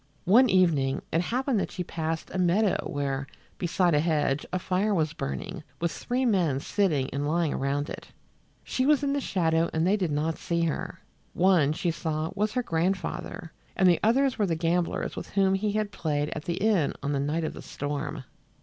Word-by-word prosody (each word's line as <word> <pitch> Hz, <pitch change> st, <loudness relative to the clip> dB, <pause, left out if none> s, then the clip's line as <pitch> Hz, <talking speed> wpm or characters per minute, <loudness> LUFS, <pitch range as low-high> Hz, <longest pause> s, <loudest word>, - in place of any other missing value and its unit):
One 240 Hz, +7 st, +6 dB
evening 155 Hz, -8 st, +2 dB
it 165 Hz, -, +3 dB
happened 250 Hz, +4 st, 0 dB
that -, -, -2 dB
she 180 Hz, -, -4 dB
passed 160 Hz, -1 st, -4 dB
a 185 Hz, -, -1 dB
meadow 185 Hz, +3 st, +2 dB
where, 140 Hz, -1 st, -2 dB, 0.3 s
beside 175 Hz, 0 st, +2 dB
a 150 Hz, -, +4 dB
hedge, 150 Hz, -3 st, 0 dB
a 185 Hz, -, 0 dB
fire 190 Hz, +3 st, 0 dB
was 160 Hz, -2 st, 0 dB
burning, 70 Hz, -, -5 dB, 0.2 s
with 170 Hz, 0 st, 0 dB
three 255 Hz, +2 st, -1 dB
men 175 Hz, -, +2 dB
sitting 150 Hz, -6 st, +1 dB
and 140 Hz, +1 st, -1 dB
lying 165 Hz, 0 st, +1 dB
around 140 Hz, +2 st, -1 dB
it. -, -, -8 dB, 0.6 s
She 260 Hz, +1 st, 0 dB
was 295 Hz, -1 st, +4 dB
in 280 Hz, 0 st, +1 dB
the 285 Hz, -, 0 dB
shadow 165 Hz, -6 st, +1 dB
and 160 Hz, +1 st, +1 dB
they 195 Hz, +3 st, +4 dB
did 185 Hz, -5 st, -1 dB
not 155 Hz, +2 st, -1 dB
see 170 Hz, -1 st, -1 dB
her. 160 Hz, -2 st, -3 dB, 0.3 s
One, 175 Hz, -6 st, +4 dB
she 170 Hz, +2 st, -1 dB
saw, 160 Hz, -1 st, -3 dB
was 210 Hz, +1 st, -1 dB
her 250 Hz, -1 st, 0 dB
grandfather, 175 Hz, 0 st, -2 dB, 0.2 s
and 190 Hz, -, +4 dB
the 175 Hz, -2 st, +5 dB
others 255 Hz, +3 st, +2 dB
were 205 Hz, -, +2 dB
the 165 Hz, -, 0 dB
gamblers 170 Hz, +1 st, -1 dB
with -, -, -6 dB
whom 195 Hz, -1 st, +2 dB
he 200 Hz, +2 st, 0 dB
had 215 Hz, -1 st, -1 dB
played 150 Hz, -4 st, -1 dB
at 155 Hz, -, -5 dB
the 170 Hz, -, -1 dB
inn 195 Hz, -7 st, +2 dB
on 145 Hz, -, -1 dB
the 140 Hz, -, 0 dB
night 150 Hz, +4 st, -1 dB
of 155 Hz, -, -2 dB
the -, -, -9 dB
storm. 145 Hz, 0 st, -4 dB
170 Hz, 200 wpm, -27 LUFS, 150-195 Hz, 0.6 s, One